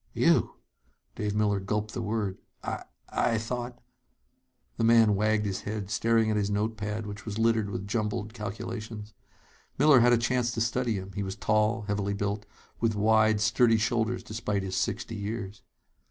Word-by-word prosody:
"You!" -, -, +3 dB, 0.6 s
Dave 105 Hz, -1 st, -2 dB
Miller 105 Hz, -2 st, +2 dB
gulped 105 Hz, +2 st, -2 dB
the 120 Hz, -, -3 dB
word. 105 Hz, -3 st, -2 dB, 0.2 s
"I -, -, -4 dB, 0.2 s
I 115 Hz, -, +1 dB
thought 120 Hz, +2 st, -4 dB, 0.5 s
" 125 Hz, -1 st, -45 dB
The 115 Hz, -, 0 dB
man 115 Hz, -2 st, +6 dB
wagged 105 Hz, +1 st, +1 dB
his 95 Hz, -2 st, -2 dB
head, 105 Hz, -2 st, -5 dB
staring 115 Hz, 0 st, +2 dB
at 105 Hz, -, +1 dB
his 100 Hz, -1 st, 0 dB
note 105 Hz, +2 st, 0 dB
pad, 105 Hz, 0 st, -4 dB
which 105 Hz, +1 st, -7 dB
was 105 Hz, -2 st, -5 dB
littered 115 Hz, -2 st, +2 dB
with 100 Hz, -1 st, -4 dB
jumbled 105 Hz, 0 st, -2 dB
calculations. 110 Hz, 0 st, -6 dB, 0.6 s
Miller 145 Hz, -1 st, +7 dB
had 120 Hz, +1 st, +5 dB
a 120 Hz, -, +6 dB
chance 120 Hz, +1 st, +1 dB
to 115 Hz, -, -2 dB
study 115 Hz, 0 st, 0 dB
him. 95 Hz, 0 st, -6 dB
He 100 Hz, -, -3 dB
was 95 Hz, -1 st, -3 dB
tall, 110 Hz, +1 st, +1 dB
heavily 100 Hz, -1 st, -1 dB
built, 100 Hz, +1 st, -2 dB, 0.3 s
with 115 Hz, -2 st, +1 dB
wide, 110 Hz, 0 st, +3 dB
sturdy 115 Hz, +2 st, +4 dB
shoulders 115 Hz, +2 st, 0 dB
despite 105 Hz, -2 st, -2 dB
his 95 Hz, -1 st, -3 dB
sixty 115 Hz, -, -2 dB
years. 105 Hz, 0 st, -5 dB
110 Hz, 170 wpm, -28 LUFS, 105-115 Hz, 0.6 s, Miller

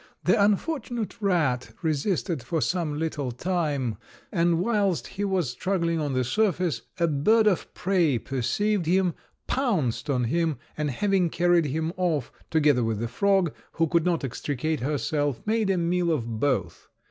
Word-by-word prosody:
The 200 Hz, -, +4 dB
unfortunate 235 Hz, -, -1 dB
rat 160 Hz, -11 st, 0 dB
resisted 160 Hz, 0 st, 0 dB
for 160 Hz, +8 st, -2 dB
some 160 Hz, -2 st, -1 dB
little 150 Hz, -5 st, -2 dB
time; 145 Hz, -, -1 dB, 0.3 s
and 170 Hz, 0 st, +2 dB
whilst 200 Hz, -3 st, +1 dB
he 200 Hz, -, -5 dB
was 185 Hz, -9 st, 0 dB
struggling 170 Hz, +2 st, -1 dB
on 145 Hz, -3 st, -1 dB
the 130 Hz, 0 st, +1 dB
surface, 180 Hz, -, 0 dB, 0.2 s
a 170 Hz, -, +3 dB
bird 215 Hz, +10 st, +3 dB
of 200 Hz, -5 st, +1 dB
prey 175 Hz, -8 st, +2 dB
perceived 170 Hz, -, -1 dB
him, 180 Hz, 0 st, +2 dB, 0.3 s
pounced 180 Hz, -, 0 dB
on 125 Hz, -3 st, +1 dB
him, 160 Hz, +4 st, 0 dB, 0.2 s
and 150 Hz, -1 st, -1 dB
having 190 Hz, +5 st, +1 dB
carried 175 Hz, -1 st, +3 dB
him 160 Hz, +4 st, -2 dB
off, 165 Hz, -8 st, 0 dB, 0.2 s
together 145 Hz, -6 st, +3 dB
with 115 Hz, -1 st, -1 dB
the 115 Hz, +2 st, -2 dB
frog, 190 Hz, +5 st, +2 dB, 0.2 s
who 165 Hz, -, +2 dB
could 170 Hz, 0 st, +2 dB
not 170 Hz, -3 st, 0 dB
extricate 145 Hz, +4 st, -2 dB
herself, 145 Hz, 0 st, -1 dB
made 220 Hz, -1 st, +1 dB
a 190 Hz, -, +2 dB
meal 175 Hz, 0 st, +1 dB
of 115 Hz, -7 st, -2 dB
both. 115 Hz, -, -1 dB
165 Hz, 155 wpm, -26 LUFS, 140-190 Hz, 0.3 s, The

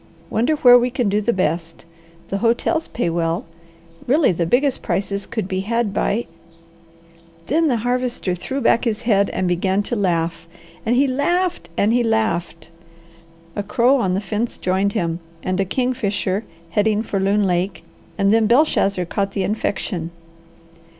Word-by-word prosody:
Wonder 245 Hz, +8 st, +2 dB
where 245 Hz, -4 st, +7 dB
we 245 Hz, +1 st, 0 dB
can 245 Hz, -4 st, 0 dB
do 205 Hz, +2 st, +1 dB
the 235 Hz, -, +1 dB
best? 165 Hz, -4 st, -2 dB, 0.4 s
The 195 Hz, -, -2 dB
hotels 235 Hz, +9 st, +1 dB
pay 230 Hz, -, -2 dB
well. 165 Hz, 0 st, -1 dB, 0.6 s
Really, 285 Hz, +1 st, +4 dB
the 170 Hz, -1 st, -1 dB
biggest 265 Hz, -, +2 dB
prices 200 Hz, 0 st, -2 dB
could 220 Hz, -5 st, -3 dB
be 190 Hz, -1 st, -2 dB
had 220 Hz, +1 st, -1 dB
by 225 Hz, +4 st, 0 dB, 0.6 s
" 165 Hz, 0 st, -28 dB
Then 320 Hz, -, +2 dB
the 250 Hz, -5 st, +2 dB
Harvester 245 Hz, -6 st, -1 dB
threw 265 Hz, +10 st, -4 dB
back 235 Hz, -, +3 dB
his 230 Hz, 0 st, -1 dB
head 200 Hz, -4 st, +3 dB
and 185 Hz, -, -1 dB
began 190 Hz, +3 st, +1 dB
to 240 Hz, -, -2 dB
laugh, 170 Hz, -5 st, -1 dB, 0.4 s
and 235 Hz, -, +3 dB
he 270 Hz, +3 st, +4 dB
laughed, 345 Hz, -, 0 dB
and 210 Hz, +3 st, +3 dB
he 245 Hz, -, +3 dB
laughed. 175 Hz, -8 st, -1 dB, 0.9 s
A -, -, -1 dB
crow 240 Hz, +6 st, +3 dB
on 185 Hz, -3 st, 0 dB
the 195 Hz, -, -1 dB
fence 210 Hz, +4 st, -3 dB
Joined 190 Hz, +2 st, 0 dB
him, 170 Hz, -1 st, -1 dB, 0.2 s
and 185 Hz, 0 st, -1 dB
a 195 Hz, -, +2 dB
kingfisher, 210 Hz, -3 st, -1 dB, 0.3 s
heading 215 Hz, +2 st, +1 dB
for 200 Hz, -3 st, -2 dB
Loon 200 Hz, +2 st, +2 dB
Lake, 180 Hz, 0 st, -1 dB, 0.3 s
and 200 Hz, 0 st, +3 dB
then 225 Hz, -1 st, +4 dB
Belshazzar 210 Hz, -, +2 dB
caught 195 Hz, +3 st, -2 dB
the 195 Hz, -, -1 dB
infection. 190 Hz, -5 st, -2 dB
205 Hz, 165 wpm, -20 LUFS, 180-240 Hz, 0.9 s, where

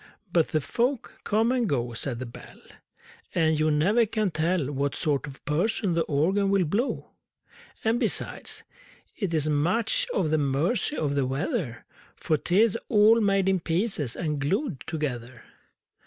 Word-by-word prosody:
But 165 Hz, -2 st, +4 dB
the 155 Hz, -, 0 dB
folk 240 Hz, -, -2 dB
come 220 Hz, +3 st, +2 dB
and 245 Hz, -5 st, +1 dB
go, 120 Hz, -4 st, -1 dB
Said 120 Hz, +1 st, -3 dB
the 130 Hz, -, -5 dB
Bell, 115 Hz, -, -12 dB, 0.8 s
And 160 Hz, -2 st, +2 dB
you 155 Hz, 0 st, +3 dB
never 200 Hz, +10 st, +3 dB
can 215 Hz, -3 st, 0 dB
tell 160 Hz, -2 st, 0 dB
What 140 Hz, 0 st, -1 dB
sort 145 Hz, -2 st, 0 dB
of 135 Hz, -1 st, -12 dB
person 185 Hz, +5 st, 0 dB
the 165 Hz, -, +2 dB
Organ 190 Hz, +8 st, +1 dB
will 195 Hz, -2 st, +3 dB
blow! 210 Hz, -, -2 dB, 0.7 s
And, 225 Hz, +2 st, +2 dB
besides, 230 Hz, -5 st, -3 dB, 0.5 s
it 200 Hz, -6 st, -2 dB
is 155 Hz, -2 st, 0 dB
much 185 Hz, -, +1 dB
at 155 Hz, -4 st, +1 dB
the 155 Hz, -, +3 dB
mercy 150 Hz, -, 0 dB
of 145 Hz, -2 st, 0 dB
the 140 Hz, -2 st, +1 dB
weather 135 Hz, -, -3 dB, 0.3 s
For 155 Hz, -, 0 dB
'tis 205 Hz, +8 st, +2 dB
all 220 Hz, +1 st, +6 dB
made 195 Hz, -2 st, +2 dB
in 190 Hz, -1 st, +3 dB
pieces 165 Hz, -, -1 dB
and 150 Hz, -3 st, -2 dB
glued 190 Hz, -, -1 dB
together! 125 Hz, -7 st, -4 dB
165 Hz, 155 wpm, -26 LUFS, 145-215 Hz, 0.8 s, all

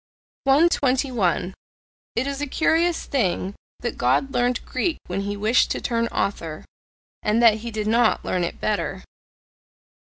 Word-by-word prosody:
121. 265 Hz, -, +2 dB, 0.6 s
It 235 Hz, -, +1 dB
is 280 Hz, 0 st, -3 dB
a 290 Hz, -, -1 dB
curious 325 Hz, +4 st, +1 dB
thing 195 Hz, -6 st, -1 dB, 0.3 s
that -, -, -4 dB
God 270 Hz, -1 st, +1 dB
learned 245 Hz, 0 st, 0 dB
Greek 315 Hz, +6 st, -1 dB
when 185 Hz, +2 st, -3 dB
he 205 Hz, +1 st, -3 dB
wished 215 Hz, +4 st, +3 dB
to -, -, -1 dB
turn 230 Hz, -1 st, 0 dB
author 165 Hz, -8 st, -3 dB, 0.6 s
and 210 Hz, +2 st, +1 dB
that 225 Hz, -2 st, +5 dB
he 235 Hz, +2 st, -6 dB
did 215 Hz, -2 st, -3 dB
not 230 Hz, +1 st, +2 dB
learn 180 Hz, -1 st, 0 dB
it 170 Hz, -, -4 dB
better. 200 Hz, -2 st, -2 dB
230 Hz, 140 wpm, -23 LUFS, 200-270 Hz, 0.6 s, that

